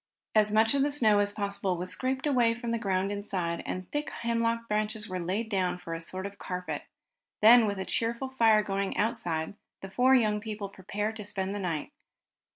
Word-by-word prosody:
As 215 -1 +4
much 220 +2 +4
of 280 - +2
the 285 - +3
snow 220 -8 +4
as 205 0 +2
possible 200 -3 -2
was 180 +1 -3
scraped 265 +2 -2
away 245 -5 +3
from 235 0 -4
the 230 - 0
ground 195 -2 0
inside, 185 -5 -2
and 185 0 -4
thick 295 +1 -2
hemlock 230 0 -1
branches 215 0 -1
were 185 -1 -4
laid 190 +6 -2
down 190 -4 0
for 175 -2 -7
a 165 - -4
sort 185 +3 -5
of 200 0 -8
carpet. 180 0 -4 0.6
Then, 225 +1 +8
with 200 -1 -2
the 190 - -3
cheerful 235 +6 -1
fire 225 -5 +4
going 195 -1 -2
outside, 175 -7 -1 0.3
the 195 - -7
four 255 +5 +4
young 210 -4 +2
people 210 -2 -5
prepared 205 +3 -4
to 210 - -6
spend 195 -1 -2
the 205 - -3
night. 165 -6 -3
210 Hz, 200 wpm, -29 LUFS, 190-230 Hz, 0.6 s, Then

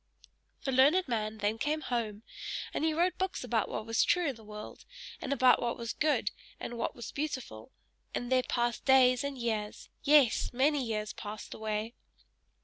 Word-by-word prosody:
The 270 - -1
learned 290 +8 +5
man 220 -3 -2
then 210 +1 -1
came 305 +3 0
home, 225 -6 -2 0.5
and - - -1
he 320 - +3
wrote 350 +3 +1
books 375 -5 -1
about 230 -3 0
what 215 - -4
was 225 0 +2
true 350 -1 +2
in 270 - -4
the 225 - -15
world, 210 0 -9 0.4
and 270 - -4
about 255 -2 +5
what 235 - -1
was 230 -1 -4
good 300 -1 +1 0.3
and 240 - -5
what 235 - -2
was 235 - -7
beautiful; 260 - -5 0.4
and 245 +1 -3
there 255 0 +5
passed 240 -1 -1
days 255 -1 +5
and 280 -1 -3
years 220 -3 -3
yes! 285 -5 +4
many 275 +3 +2
years 215 -2 -2
passed 210 0 -7
away. 220 +1 -3
245 Hz, 175 wpm, -31 LUFS, 220-280 Hz, 0.5 s, learned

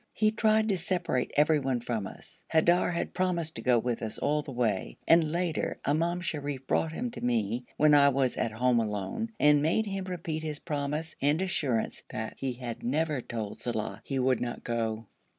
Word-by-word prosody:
He 215 0 +3
tried 220 0 +3
to 195 - +2
separate 175 -8 0
everyone 145 -4 +3
from 115 -4 -3
us. - - -12
Haidar 170 +3 +4
had 170 - -3
promised 175 -3 0
to - - -5
go 125 0 +4
with 120 0 -1
us 110 -2 -4
all 150 +1 +1
the 145 - -8
way, 105 - -1
and 165 -2 +5
later 170 -1 -1
Imam 170 +4 +1
Sharif 145 -6 -3
brought 160 +4 +1
him 240 +9 -3
to - - -8
me 120 0 0
when 150 0 +5
I 140 -1 +7
was 135 -2 +1
at 115 - -1
home 125 +1 +3
alone, 105 - -2
and 150 -1 +5
made 165 +9 +2
him 195 -2 -3
repeat 170 -3 -4
his 155 -2 -4
promise, 150 +1 -3
and 145 +3 +3
assurance 145 -11 0
that 110 0 -4
he 130 -2 -2
had 120 -2 -6
never 150 +2 0
told 110 -4 -5
Saleh 110 -3 -3
he 135 - -3
would 130 -1 +2
not 120 -1 -4
go. 115 -1 -2
145 Hz, 190 wpm, -29 LUFS, 120-165 Hz, -, I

